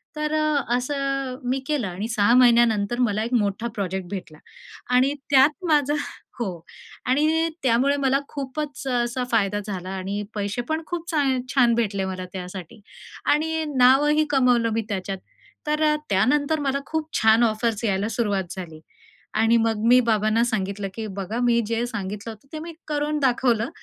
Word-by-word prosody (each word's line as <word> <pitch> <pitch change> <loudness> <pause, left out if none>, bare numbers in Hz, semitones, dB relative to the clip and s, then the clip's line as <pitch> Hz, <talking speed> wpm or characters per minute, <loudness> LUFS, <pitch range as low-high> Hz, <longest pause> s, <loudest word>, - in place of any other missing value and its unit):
तर 300 0 -2
अ, 305 -2 +1
असं 275 0 -2
मी 265 +1 +1
केलं 290 -8 0
आणि 185 +4 -4
6 225 -1 +3
महिन्यानंतर 235 -3 +4
मला 210 0 -1
एक 235 +3 -4
मोठा 215 0 0
प्रोजेक्ट 190 -2 -3
भेटला 180 -6 -7 0.6
आणि 260 +3 +4 0.2
त्यात 285 +6 +4
माझं 295 -1 +3 0.4
हो 235 - -1 0.6
आणि 310 +5 +2
त्यामुळे 260 +3 +3
मला 270 -1 +2
खूपच 280 0 -5
असा 245 0 0
फायदा 205 -3 +1
झाला 185 -3 -5
आणि 195 +2 -3
पैसे 205 +3 -2
पण 315 +1 0
खूप 345 -1 -5
चा 310 -3 +1 0.3
छान 245 -4 +4
भेटले 200 -4 0
मला 185 -1 -4
त्यासाठी 185 +3 -8 0.5
आणि 320 +2 0
नावही 290 +5 +5
कमावलं 250 -4 +3
मी 225 - 0
त्याच्यात. 195 -1 -3 0.5
तर 300 +1 0
अ, 305 0 +4
त्यानंतर 285 +10 +2
मला 280 -1 0
खूप 315 0 -3
छान 220 +2 +5
ऑफर्स 225 0 0
यायला 200 0 0
सुरुवात 205 -4 0
झाली 165 -4 -7 0.6
आणि 225 +1 +4
मग 220 -1 0
मी 250 +1 +7
बाबांना 215 +1 +2
सांगितलं, 200 -3 -2
की 220 +1 -5
"बघा 200 +4 -3
मी 240 -1 +3
जे 230 +1 -1
सांगितलं 210 -1 -5
होतं 220 +5 -15
ते 310 - -4
मी 335 0 -8
करून 300 0 -1
दाखवलं 245 -3 +1
235 Hz, 160 wpm, -24 LUFS, 205-280 Hz, 0.6 s, मी